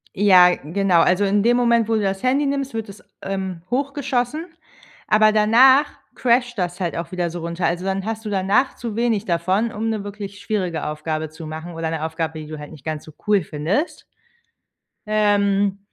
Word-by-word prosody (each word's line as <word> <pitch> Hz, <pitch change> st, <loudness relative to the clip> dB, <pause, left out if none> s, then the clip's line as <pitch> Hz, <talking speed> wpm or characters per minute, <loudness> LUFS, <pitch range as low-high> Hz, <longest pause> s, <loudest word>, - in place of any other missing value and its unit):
Ja, 180 Hz, -3 st, +6 dB
genau. 180 Hz, +3 st, +1 dB
Also 185 Hz, +4 st, +3 dB
in 200 Hz, +1 st, +2 dB
dem 240 Hz, +1 st, +4 dB
Moment, 235 Hz, -2 st, +3 dB
wo 225 Hz, -, +2 dB
du 215 Hz, -, +1 dB
das 195 Hz, +1 st, -2 dB
Handy 270 Hz, +3 st, +2 dB
nimmst, 275 Hz, -2 st, -2 dB
wird 220 Hz, -2 st, -4 dB
es, 200 Hz, -, -12 dB, 0.2 s
ähm, 190 Hz, -3 st, -4 dB
hochgeschossen, 275 Hz, +2 st, -1 dB, 0.6 s
aber 215 Hz, 0 st, +5 dB
danach 245 Hz, +7 st, +6 dB, 0.3 s
crasht 245 Hz, -1 st, +1 dB
das 180 Hz, 0 st, -2 dB
halt 175 Hz, -3 st, -2 dB
auch 170 Hz, +2 st, -5 dB
wieder 175 Hz, -2 st, -1 dB
so 170 Hz, +1 st, -6 dB
runter. 170 Hz, +2 st, -3 dB
Also, 175 Hz, +2 st, -1 dB
dann 195 Hz, 0 st, -1 dB
hast 225 Hz, 0 st, -4 dB
du -, -, -3 dB
danach 195 Hz, +7 st, +1 dB
zu 230 Hz, -3 st, -6 dB
wenig 225 Hz, -3 st, 0 dB
davon, 185 Hz, +6 st, 0 dB
um 225 Hz, 0 st, -3 dB
'ne 215 Hz, -2 st, -2 dB
wirklich 205 Hz, 0 st, -8 dB
schwierige 180 Hz, -7 st, -2 dB
Aufgabe 155 Hz, +1 st, -3 dB
zu 160 Hz, +1 st, -10 dB
machen 160 Hz, +2 st, -7 dB
oder 165 Hz, 0 st, -3 dB
'ne 160 Hz, -1 st, -3 dB
Aufgabe, 160 Hz, 0 st, -3 dB
die 155 Hz, -, -8 dB
du 155 Hz, 0 st, -7 dB
halt 150 Hz, 0 st, -9 dB
nicht 155 Hz, -4 st, -13 dB
ganz 155 Hz, -1 st, -4 dB
so 155 Hz, -, -13 dB
cool 205 Hz, -4 st, +3 dB
findest. 165 Hz, -, -2 dB, 1.1 s
Ähm, 200 Hz, -2 st, +2 dB
200 Hz, 190 wpm, -21 LUFS, 170-225 Hz, 1.1 s, Ja